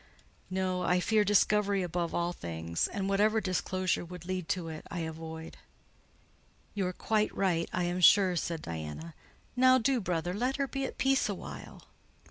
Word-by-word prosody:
"No: 185 -1 -1
I 180 0 +2
fear 215 +3 +3
discovery 205 -1 +3
above 175 -1 -2
all 175 0 0
things; 85 - -2
and 195 -1 -3
whatever 210 +3 +3
disclosure 185 -2 -1
would 175 0 -9
lead 185 -2 -3
to 180 -3 -1
it, 160 -1 -7
I 175 - -4
avoid." 160 0 -7 1.2
"You 195 -3 -1
are - - -1
quite 215 +3 0
right, 175 -4 +1
I 180 - -1
am 175 +1 -1
sure," 185 0 +6
said 165 -1 -2
Diana. 80 - -6 0.4
"Now 255 +1 +6
do, 255 0 +1
brother, 175 -1 -1
let 250 +6 0
her 275 -1 -1
be 270 0 -3
at - - -6
peace 270 0 +2
a - - -1
while." - - -9
180 Hz, 170 wpm, -30 LUFS, 165-210 Hz, 1.2 s, sure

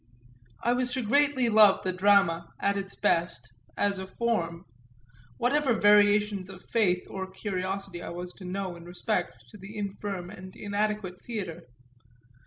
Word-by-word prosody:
I 240 - +3
was 250 0 0
greatly 265 +3 +2
to 230 - +1
love 210 -2 +6
the 185 - -1
drama, 180 -3 +3
at 200 0 +1
its 195 0 -5
best, 165 - 0 0.2
as 200 -1 +1
a 190 - -6
"form"; 190 -6 -2 0.7
whatever 260 0 +2
variations 205 -2 +4
of 190 -1 -11
faith 185 -6 +1
or 190 -1 -5
curiosity 190 -1 -4
I - - -6
was 175 +1 -6
to 190 - -10
know 185 0 -3
in 170 - -11
respect 175 - -3
to - - -13
the 195 +3 -9
infirm 195 -3 -4
and 185 -2 -11
inadequate 205 -2 -2
theatre. 185 - -5
195 Hz, 150 wpm, -28 LUFS, 180-210 Hz, 0.7 s, love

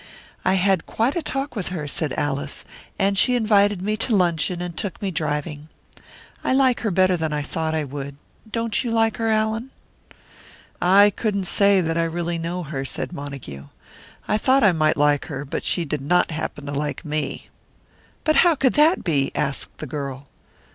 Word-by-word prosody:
"I 185 - +2
had 190 -2 +2
quite 235 +5 0
a 345 - 0
talk 275 -2 -3
with 200 -5 -3
her," 165 -5 -4
said 145 0 -2
Alice. 145 -1 -1 0.3
"And 195 0 +2
she 250 - +4
invited 205 -4 +3
me 210 +2 0
to 225 0 +1
luncheon, 175 -2 +1
and 175 -1 -5
took 200 0 -4
me 195 -2 -2
driving. 150 -1 -3 0.7
I - - +1
like 260 -2 +3
her 220 - -1
better 185 0 +3
than 160 -2 -2
I 150 -1 -1
thought 160 +2 -2
I 155 - 0
would. 140 0 -6 0.4
Don't 230 +1 0
you 240 - -2
like 225 -1 +1
her, 225 -1 0
Allan?" 220 +3 0 1.1
"I 200 +3 +6
couldn't 200 -1 -1
say 200 +1 +4
that 165 -1 -1
I - - +3
really 170 0 -2
know 175 +2 -3
her," 140 -3 -4
said 135 - -5
Montague. 140 - -8 0.6
"I 215 - +1
thought 265 +2 +3
I 205 - +6
might 155 -2 +1
like 145 0 +3
her, 140 -1 -5
but 135 - -4
she 175 - 0
did 150 -2 -3
not 175 +5 +2
happen 155 -2 -5
to 140 - -5
like 145 +4 -3
me." 150 0 -3 0.7
"But 310 - +2
how 345 -2 +6
could 260 -2 +2
that 310 +5 +4
be?" 145 -6 +1
asked 140 -2 -3
the - - -6
girl. 140 -1 -5
175 Hz, 190 wpm, -22 LUFS, 150-215 Hz, 1.1 s, I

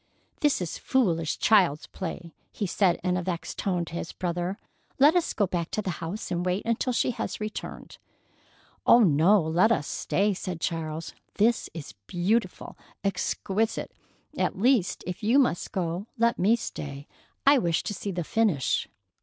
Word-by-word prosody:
"This 290 -9 +2
is 175 - -4
foolish 170 - +1
child's 180 -9 +3
play!" 170 -2 -7 0.2
he 210 - -3
said 185 -1 +2
in 180 -1 +1
a - - -1
vexed 170 -3 -4
tone 180 -3 0
to 165 - -11
his 170 - -5
brother. 175 +2 -2 0.4
"Let 290 +5 +6
us 355 - +2
go 205 - +1
back 175 -2 -2
to 215 - -2
the 190 - -2
house 170 +6 -5
and 175 0 -1
wait 180 +2 -1
until 230 +2 0
she 250 - +1
has 230 -1 -4
returned." 215 0 -6 0.8
"Oh, 240 - +7
no, 180 +2 +5
let 175 +8 +3
us 190 -10 +1
stay!" 205 +7 0
said 185 -2 -5
Charles. 160 -1 -3 0.2
"This 225 +3 +2
is 155 -8 -7
beautiful! 190 +3 -1 0.3
Exquisite! 200 +2 -1 0.4
At - - -1
least, 230 -2 +2
if 180 +3 -5
you 225 +5 +3
must 245 -11 +2
go, 180 +2 -2
let 235 +1 +2
me 210 +6 +4
stay. 145 -10 -6 0.4
I 280 0 +7
wish 170 -6 0
to - - -3
see 200 - -5
the 175 -2 -2
finish." 185 - +1
185 Hz, 165 wpm, -27 LUFS, 170-220 Hz, 0.8 s, Oh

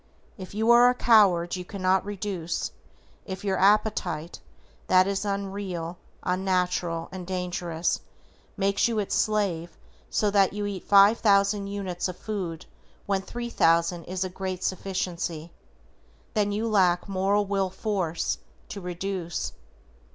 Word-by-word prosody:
If 190 -1 -9
you 220 +2 +3
are 240 +1 +8
a 250 - +1
coward 195 -9 +4
you 180 - -5
cannot 185 0 +1
reduce, 195 -4 -3 0.6
if 190 -1 -6
your 195 -2 0
appetite, 195 -5 +1 0.5
that 185 0 +5
is 200 +1 -1
unreal, 195 -4 -4 0.2
unnatural 180 -2 0
and 185 -2 -7
dangerous, 180 -2 -2 0.6
makes 200 +2 +2
you 230 -2 -1
its 205 -2 -1
slave 195 -6 0 0.3
so 210 -1 +1
that 195 -2 +3
you 205 0 -3
eat 200 -3 -5
5,000 200 0 +5
units 195 -3 -3
of 185 - -6
food 185 -7 -4 0.4
when 195 -1 0
3,000 175 -6 +1
is 185 +1 -2
a 185 - -3
great 185 0 -5
sufficiency, 175 -3 -3 0.8
then 205 -2 +1
you 215 +3 -1
lack 185 -5 +3
MORAL 200 +1 +1
WILL 195 -1 0
FORCE 185 -5 -2 0.3
TO 200 - -6
REDUCE. 180 -1 -4
190 Hz, 130 wpm, -26 LUFS, 180-205 Hz, 0.8 s, are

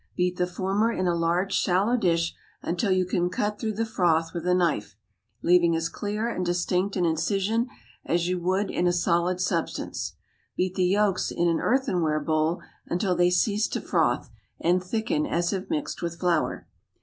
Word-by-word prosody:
Beat 180 0 0
the 180 - +1
former 195 +5 0
in 185 - -1
a 175 - +2
large 170 +3 0
shallow 195 +6 +2
dish 170 -7 +1 0.3
until 180 +4 0
you 185 0 +3
can 175 0 0
cut 210 +3 -2
through 220 -1 -2
the 225 +2 -1
froth 165 -6 +1
with 170 0 -4
a 180 - +4
knife, 165 - 0 0.5
leaving 170 -1 +4
as 165 0 -1
clear 210 +2 -3
and 205 -6 -2
distinct 180 +2 0
an 180 -3 +1
incision 200 +8 0 0.3
as 170 +1 0
you 180 0 0
would 190 +3 0
in 175 - +1
a 175 - +3
solid 175 +1 +1
substance. 185 - -2 0.4
Beat 185 0 0
the 185 -1 +1
yolks 195 0 +2
in 175 - 0
an 165 -1 +2
earthenware 185 - +1
bowl 155 +3 0 0.2
until 180 +1 0
they 175 0 +4
cease 205 +4 +2
to - - -3
froth, - - 0 0.3
and 180 +2 +2
thicken 230 +10 -1
as 175 -2 0
if 190 -1 -4
mixed 310 -1 -3
with 170 -1 -4
flour. 175 -3 0
180 Hz, 180 wpm, -26 LUFS, 170-200 Hz, 0.5 s, a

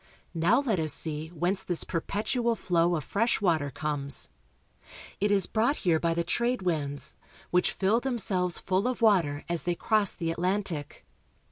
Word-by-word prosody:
Now 180 +10 +3
let 225 -10 0
us 155 -1 +5
see 155 +1 -2
whence 175 +4 -1
this 175 -2 -2
perpetual 220 +7 -1
flow 175 -3 +1
of 155 - -3
fresh 225 - +1
water 165 -8 +1
comes. 140 0 -3 0.9
It 205 - +1
is 200 -2 +3
brought 230 +6 +1
here 165 -3 +3
by 165 0 0
the 170 - 0
trade 235 +6 0
winds, 145 -5 -2 0.4
which 180 0 +2
fill 200 +4 +2
them 255 -1 -2
selves 180 -5 0
full 190 +4 0
of 250 -2 -2
water 165 -10 +3
as 170 -1 0
they 175 -1 -1
cross 215 +2 +2
the 165 -2 -2
Atlantic. 175 -3 -3
180 Hz, 165 wpm, -28 LUFS, 160-210 Hz, 0.9 s, us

